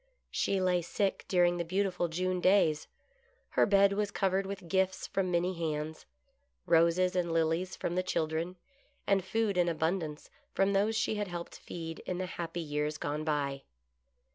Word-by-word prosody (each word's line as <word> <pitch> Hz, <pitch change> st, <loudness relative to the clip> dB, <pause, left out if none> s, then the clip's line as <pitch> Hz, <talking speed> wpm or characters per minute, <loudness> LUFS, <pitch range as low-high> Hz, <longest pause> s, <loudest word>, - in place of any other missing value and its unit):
She 195 Hz, -, +1 dB
lay 180 Hz, -1 st, +2 dB
sick 195 Hz, +3 st, -1 dB
during 175 Hz, -1 st, +3 dB
the 170 Hz, -, -1 dB
beautiful 185 Hz, 0 st, 0 dB
June 180 Hz, +2 st, -1 dB
days. 180 Hz, -6 st, +3 dB, 0.6 s
Her -, -, +3 dB
bed 200 Hz, -1 st, +5 dB
was 205 Hz, 0 st, 0 dB
covered 195 Hz, -1 st, 0 dB
with 195 Hz, -2 st, -6 dB
gifts 190 Hz, +1 st, +1 dB
from 190 Hz, -2 st, -1 dB
many 175 Hz, +1 st, +1 dB
hands: 155 Hz, -2 st, -4 dB, 0.6 s
roses 170 Hz, +3 st, +3 dB
and 175 Hz, -2 st, 0 dB
lilies 165 Hz, +3 st, +1 dB
from 170 Hz, -, -3 dB
the 185 Hz, -, +1 dB
children, 165 Hz, 0 st, -2 dB, 0.5 s
and 195 Hz, -2 st, +2 dB
food 210 Hz, 0 st, 0 dB
in 175 Hz, -1 st, +3 dB
abundance 160 Hz, -1 st, -2 dB, 0.2 s
from 195 Hz, +1 st, +3 dB
those 205 Hz, +3 st, +2 dB
she 220 Hz, -1 st, 0 dB
had 205 Hz, -1 st, -1 dB
helped 175 Hz, -1 st, -6 dB
feed 165 Hz, -1 st, -6 dB
in 180 Hz, -, -2 dB
the 185 Hz, -, -2 dB
happy 170 Hz, -1 st, -4 dB
years 150 Hz, -1 st, -2 dB
gone 150 Hz, +1 st, -3 dB
by. 140 Hz, -3 st, -1 dB
180 Hz, 165 wpm, -31 LUFS, 165-190 Hz, 0.6 s, bed